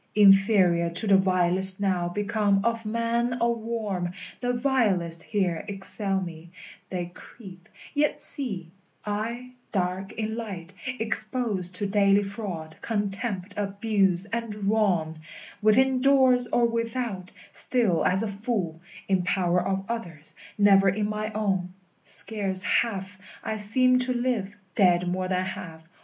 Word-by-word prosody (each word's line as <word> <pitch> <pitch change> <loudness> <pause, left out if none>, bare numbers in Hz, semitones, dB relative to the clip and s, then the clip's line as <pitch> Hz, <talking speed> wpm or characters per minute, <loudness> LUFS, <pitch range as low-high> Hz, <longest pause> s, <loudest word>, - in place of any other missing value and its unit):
Inferior 195 -4 +5
to 175 +6 +3
the 200 -2 +5
vilest 185 0 +4
now 185 -3 0
become 205 +1 0
Of 230 -1 -1
man 235 +2 -1
or 235 0 +2
worm; 215 -6 -4 0.3
the 245 -1 -1
vilest 215 -10 0
here 180 -5 -2
excel 195 0 -3
me: 170 -2 -8 0.4
They 175 -2 -4
creep, 185 -4 -14 0.2
yet 295 0 0
see; 200 - +1 0.3
I, 230 +4 -4 0.2
dark 185 0 -2
in 220 0 -4
light, 195 -6 -7 0.2
exposed 215 -4 +1
To 205 - +1
daily 200 0 +3
fraud, 190 -6 -7
contempt, 205 -2 -3
abuse, 200 -2 0
and 230 0 -4 0.2
wrong, 175 -8 0 0.4
Within 255 +5 +3
doors 260 -2 +4
or 240 - +2
without, 230 -4 -3 0.2
still 225 -10 +4
as 190 +4 +2
a - - -2
fool, 200 -6 -3 0.3
In 190 -2 +1
power 180 -1 0
of 195 +1 -2
others, 175 -10 -5 0.2
never 195 -1 +5
in 205 +2 -1
my 215 +1 -3
own; 190 -4 -2 0.3
Scarce 195 -4 +3
half 195 -1 -1 0.2
I 220 - -3
seem 255 +5 +2
to 250 0 +1
live, 235 -5 -2 0.2
dead 180 -2 +3
more 185 +1 -2
than 185 0 -1
half. 165 -3 -8
200 Hz, 130 wpm, -25 LUFS, 185-230 Hz, 0.4 s, Inferior